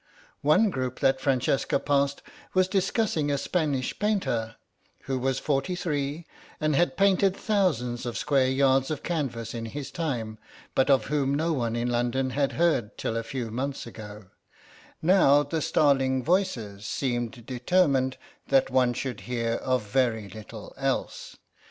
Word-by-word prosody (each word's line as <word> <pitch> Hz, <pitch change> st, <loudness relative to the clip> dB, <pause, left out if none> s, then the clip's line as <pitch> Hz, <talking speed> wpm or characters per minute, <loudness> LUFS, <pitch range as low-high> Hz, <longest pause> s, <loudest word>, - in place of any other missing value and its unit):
One 185 Hz, +9 st, +4 dB
group 130 Hz, -4 st, -3 dB
that 135 Hz, 0 st, +3 dB
Francesca 135 Hz, 0 st, +1 dB
passed 140 Hz, 0 st, 0 dB, 0.3 s
was 185 Hz, 0 st, +4 dB
discussing 190 Hz, -5 st, 0 dB
a 140 Hz, -, +1 dB
Spanish 145 Hz, -5 st, -1 dB
painter, 130 Hz, -, 0 dB, 0.5 s
who 130 Hz, -1 st, -2 dB
was 135 Hz, +1 st, 0 dB
forty 145 Hz, +6 st, -1 dB
three, 150 Hz, -2 st, -2 dB, 0.3 s
and 155 Hz, -1 st, +1 dB
had 175 Hz, +4 st, +2 dB
painted 195 Hz, 0 st, +3 dB
thousands 130 Hz, -, 0 dB
of 115 Hz, -1 st, -3 dB
square 135 Hz, -2 st, +2 dB
yards 135 Hz, 0 st, +3 dB
of 155 Hz, -2 st, -4 dB
canvas 125 Hz, -9 st, -3 dB
in 115 Hz, -1 st, -4 dB
his 140 Hz, +3 st, -6 dB
time, 120 Hz, -10 st, -3 dB, 0.3 s
but 135 Hz, +1 st, +2 dB
of 135 Hz, -2 st, +4 dB
whom 140 Hz, -1 st, 0 dB
no 160 Hz, +3 st, 0 dB
one 120 Hz, -5 st, -1 dB
in 120 Hz, +1 st, -1 dB
London 125 Hz, +2 st, 0 dB
had 140 Hz, +1 st, 0 dB
heard 160 Hz, -11 st, +1 dB
till 115 Hz, -, -2 dB
a 115 Hz, -, 0 dB
few 115 Hz, -1 st, -5 dB
months 135 Hz, +4 st, -3 dB
ago; 105 Hz, -3 st, -10 dB, 0.8 s
now 155 Hz, -5 st, +5 dB
the 155 Hz, +2 st, -3 dB
starling 135 Hz, -4 st, +2 dB
voices 115 Hz, -, -1 dB
seemed 120 Hz, -3 st, -2 dB
determined 130 Hz, 0 st, +1 dB, 0.3 s
that 135 Hz, -1 st, +3 dB
one 125 Hz, -1 st, +3 dB
should 125 Hz, -2 st, -4 dB
hear 115 Hz, -2 st, 0 dB
of 130 Hz, 0 st, 0 dB
very 110 Hz, -1 st, 0 dB
little 110 Hz, +3 st, -10 dB
else. -, -, -3 dB
135 Hz, 150 wpm, -27 LUFS, 120-155 Hz, 0.8 s, now